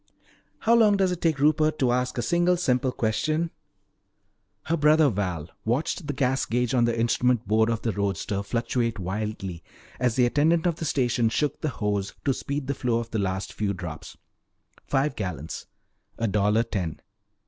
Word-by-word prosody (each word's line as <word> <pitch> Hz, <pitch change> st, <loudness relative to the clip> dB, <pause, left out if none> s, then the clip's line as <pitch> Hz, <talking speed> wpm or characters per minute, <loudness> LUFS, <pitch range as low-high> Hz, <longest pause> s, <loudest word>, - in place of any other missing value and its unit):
"How 230 Hz, -, +3 dB
long 215 Hz, -3 st, +5 dB
does 190 Hz, -2 st, +2 dB
it 180 Hz, -, -4 dB
take 160 Hz, -3 st, +2 dB
Rupert 155 Hz, +2 st, +3 dB
to 125 Hz, -3 st, +2 dB
ask 125 Hz, +1 st, 0 dB
a 120 Hz, -, 0 dB
single 175 Hz, +6 st, +2 dB
simple 130 Hz, -6 st, +1 dB
question?" 155 Hz, +9 st, 0 dB, 1.1 s
Her 165 Hz, -, 0 dB
brother 150 Hz, -1 st, +5 dB
Val 90 Hz, -6 st, -3 dB
watched 140 Hz, -, -1 dB
the 145 Hz, -, -1 dB
gas 130 Hz, 0 st, +1 dB
gage 125 Hz, +1 st, 0 dB
on 120 Hz, -2 st, +4 dB
the 115 Hz, -1 st, 0 dB
instrument 120 Hz, 0 st, +2 dB
board 110 Hz, +2 st, +3 dB
of 115 Hz, -2 st, -2 dB
the 115 Hz, -, +1 dB
roadster 100 Hz, 0 st, -2 dB
fluctuate 115 Hz, +2 st, -1 dB
wildly 95 Hz, -2 st, -4 dB, 0.4 s
as 125 Hz, -3 st, +1 dB
the 125 Hz, -, +4 dB
attendant 160 Hz, +7 st, +2 dB
of 170 Hz, -2 st, +1 dB
the 165 Hz, -, -4 dB
station 120 Hz, -5 st, +1 dB
shook 145 Hz, +5 st, -1 dB
the 155 Hz, -, 0 dB
hose 105 Hz, -5 st, -2 dB
to 135 Hz, -, +3 dB
speed 140 Hz, +2 st, -4 dB
the 140 Hz, -, -1 dB
flow 125 Hz, -3 st, 0 dB
of 115 Hz, -1 st, -4 dB
the 110 Hz, -, -1 dB
last 95 Hz, 0 st, -2 dB
few 100 Hz, -2 st, -1 dB
drops. 85 Hz, -5 st, -8 dB, 0.7 s
Five 140 Hz, +2 st, +1 dB
gallons 85 Hz, -6 st, -5 dB, 0.5 s
a 115 Hz, -, 0 dB
dollar 105 Hz, +2 st, +2 dB
ten. 90 Hz, -9 st, -3 dB
120 Hz, 175 wpm, -26 LUFS, 105-150 Hz, 1.1 s, long